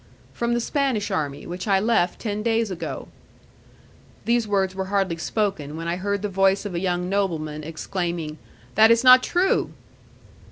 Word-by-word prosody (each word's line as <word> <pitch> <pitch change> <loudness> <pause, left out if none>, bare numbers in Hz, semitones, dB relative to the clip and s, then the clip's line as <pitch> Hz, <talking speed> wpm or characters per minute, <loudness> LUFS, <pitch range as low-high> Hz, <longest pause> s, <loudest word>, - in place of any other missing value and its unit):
"From 235 0 -1
the - - +1
Spanish 240 -5 -1
army, 145 -6 -2
which 180 +4 -6
I 195 -2 +4
left 200 -4 +1
ten 210 -2 -3
days 225 -1 0
ago." 180 - -5 1.2
These 235 -1 +1
words 195 -2 +1
were 190 0 -3
hardly 190 -3 0
spoken, 170 -6 -2
when 165 +1 -5
I 170 +1 -1
heard 200 +1 -2
the - - 0
voice 195 +1 +2
of 200 - -4
a 170 - -1
young 180 -1 -1
nobleman 160 -6 -2
exclaiming; 165 -1 -4 0.3
"That 220 +1 +6
is 230 +1 +4
not 255 0 +9
true." 360 +7 +1
195 Hz, 165 wpm, -23 LUFS, 175-220 Hz, 1.2 s, not